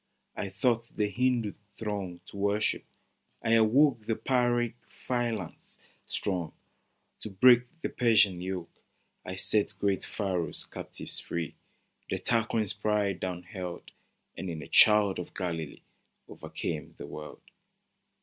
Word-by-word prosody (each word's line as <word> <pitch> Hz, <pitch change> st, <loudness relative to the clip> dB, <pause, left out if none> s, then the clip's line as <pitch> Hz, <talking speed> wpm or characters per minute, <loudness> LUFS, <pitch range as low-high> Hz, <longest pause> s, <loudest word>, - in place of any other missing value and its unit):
I 100 Hz, -, -3 dB
taught 115 Hz, +4 st, 0 dB
the 105 Hz, -1 st, +1 dB
Hindoo 120 Hz, -1 st, +1 dB, 0.2 s
throng 100 Hz, -5 st, -4 dB
To 100 Hz, -, -11 dB
worship: 100 Hz, +2 st, +1 dB, 0.6 s
I 115 Hz, -, +1 dB
awoke 115 Hz, +1 st, +4 dB
The 115 Hz, -, +1 dB
Pyrrhic 120 Hz, -2 st, +1 dB
phalanx 115 Hz, -8 st, -3 dB, 0.3 s
strong. 90 Hz, -5 st, -2 dB, 0.7 s
To -, -, -5 dB
break 120 Hz, +5 st, +6 dB
the -, -, -1 dB
Persian 110 Hz, -7 st, +4 dB
yoke: 90 Hz, -2 st, -5 dB, 0.4 s
I 95 Hz, -, -5 dB
set 105 Hz, +2 st, +2 dB
great 100 Hz, -2 st, +1 dB
Pharaoh's 95 Hz, -5 st, -2 dB
captives -, -, -2 dB
free, 85 Hz, -3 st, -4 dB, 0.6 s
The -, -, 0 dB
Tarquin's 115 Hz, -3 st, +1 dB
pride 105 Hz, -3 st, 0 dB
down 90 Hz, -1 st, -3 dB
hurled, 90 Hz, -5 st, -7 dB, 0.4 s
And 95 Hz, -, -5 dB
in 80 Hz, -3 st, -5 dB
a -, -, -10 dB
child 105 Hz, -3 st, +6 dB
of 90 Hz, -, -7 dB
Galilee, 85 Hz, -5 st, -4 dB, 0.4 s
O'ercame 75 Hz, -3 st, -5 dB
the -, -, -7 dB
world 75 Hz, 0 st, -9 dB
105 Hz, 125 wpm, -30 LUFS, 90-115 Hz, 0.7 s, break